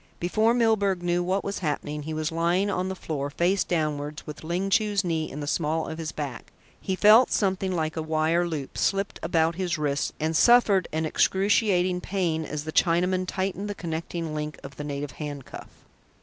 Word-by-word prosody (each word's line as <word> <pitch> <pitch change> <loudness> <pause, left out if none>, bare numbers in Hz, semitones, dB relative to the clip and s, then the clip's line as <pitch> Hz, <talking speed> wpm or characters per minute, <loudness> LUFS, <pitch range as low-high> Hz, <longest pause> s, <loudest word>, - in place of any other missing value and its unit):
Before 215 +7 +2
Milburgh 205 -6 +2
knew 175 0 +1
what 185 +2 0
was 200 0 -3
happening, 150 -2 -3
he 155 +2 -5
was 155 +1 -2
lying 175 +5 +1
on 185 -1 -1
the 190 - -3
floor, 145 -5 -4
face 175 +6 +1
downwards, 150 -3 -2
with 150 +1 -8
Ling 180 +4 -2
Chu's 205 -1 +2
knee 160 -3 -1
in 150 - -7
the - - -3
small 160 +1 -1
of 160 - -6
his 160 -1 -4
back. 140 -6 -6 0.3
He 190 - -1
felt 215 +6 +7
something 190 -2 0
like 160 -3 -1
a 160 - -2
wire 160 +2 +1
loop 150 -5 -5
slipped 195 0 0
about 165 0 +1
his 180 -2 -1
wrists, 145 -2 -1
and 160 +1 -1
suffered 210 -2 +5
an 160 +1 -1
excruciating 190 0 +2
pain 170 -5 -1
as 150 0 -4
the 155 - -5
Chinaman 180 +2 +2
tightened 195 +2 -2
the 205 - -4
connecting 165 -2 -4
link 150 -1 -4
of 135 0 -9
the 150 - -5
native 145 -1 -4
handcuff. 145 0 -7
170 Hz, 190 wpm, -26 LUFS, 155-190 Hz, 0.3 s, felt